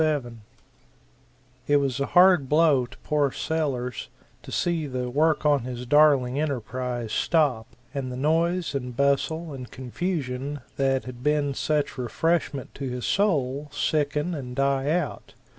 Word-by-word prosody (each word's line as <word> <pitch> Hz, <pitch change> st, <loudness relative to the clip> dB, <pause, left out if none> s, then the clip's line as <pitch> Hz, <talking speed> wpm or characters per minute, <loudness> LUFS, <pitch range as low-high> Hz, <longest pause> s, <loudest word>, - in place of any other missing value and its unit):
It 145 Hz, -, +5 dB
was 135 Hz, -2 st, 0 dB
a 140 Hz, -, 0 dB
hard 180 Hz, -6 st, +5 dB
blow 150 Hz, -5 st, +4 dB
to -, -, -15 dB
poor 145 Hz, -2 st, +1 dB
Sellers 135 Hz, -8 st, -2 dB, 0.3 s
to -, -, -11 dB
see 170 Hz, -3 st, 0 dB
the 125 Hz, -2 st, -3 dB
work 155 Hz, +3 st, +2 dB
on 145 Hz, -1 st, +4 dB
his 125 Hz, 0 st, -6 dB
darling 140 Hz, -2 st, +4 dB
enterprise 125 Hz, -4 st, -3 dB
stop, 135 Hz, -6 st, +1 dB, 0.3 s
and 135 Hz, -3 st, -3 dB
the 125 Hz, -, -5 dB
noise 165 Hz, +4 st, +1 dB
and 125 Hz, -3 st, -4 dB
bustle 145 Hz, +3 st, +1 dB
and 125 Hz, -2 st, -8 dB
confusion 135 Hz, 0 st, -4 dB, 0.2 s
that 135 Hz, -1 st, +1 dB
had 125 Hz, -1 st, -9 dB
been 145 Hz, 0 st, +1 dB
such 150 Hz, -1 st, -1 dB
refreshment 140 Hz, +2 st, -1 dB
to 135 Hz, -2 st, -5 dB
his 125 Hz, -1 st, -4 dB
soul, 150 Hz, -8 st, 0 dB
sicken 150 Hz, +2 st, 0 dB
and 125 Hz, -5 st, -6 dB
die 135 Hz, 0 st, +1 dB
out. 160 Hz, -4 st, -2 dB
140 Hz, 140 wpm, -25 LUFS, 125-155 Hz, 0.3 s, It